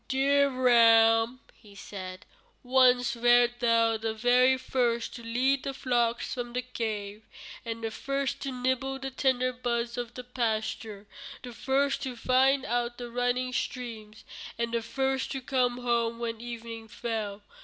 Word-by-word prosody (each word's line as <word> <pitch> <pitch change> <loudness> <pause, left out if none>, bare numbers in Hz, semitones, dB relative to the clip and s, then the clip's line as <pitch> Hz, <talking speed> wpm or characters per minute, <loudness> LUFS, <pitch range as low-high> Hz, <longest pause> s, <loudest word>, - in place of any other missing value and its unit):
"Dear 280 +1 +3
ram," 230 -1 +5 0.3
said 185 -1 -8 0.4
he, - - -19
"once 250 -1 +4
wert 240 0 +4
thou 230 -2 +3
the 220 0 -3
very 250 +3 +4
first 245 -3 -1
to 235 - -8
lead 255 +4 +1
the 275 - -5
flocks 240 -3 0
from 240 -2 -5
the 250 0 -2
cave, 215 -4 -4 0.4
the 230 -1 -4
first 275 +3 -3
to 275 - -3
nibble 260 +1 -1
the 270 0 -6
tender 255 -1 +1
buds 235 -1 -2
of 240 -1 -6
the 250 - -6
pasture, 220 -3 -3 0.4
the 245 -2 -8
first 275 +3 0
to 255 -2 -4
find 265 +3 +2
out 240 -1 -1
the 240 -1 -7
running 245 +1 -1
streams, 225 -4 -5 0.3
and 235 0 -2
the 235 - +1
first 265 +3 -1
to 270 - -3
come 250 -2 0
home 235 -1 0
when 230 -1 -4
evening 230 -1 -7
fell. 215 -3 -4
240 Hz, 150 wpm, -28 LUFS, 230-255 Hz, 0.4 s, ram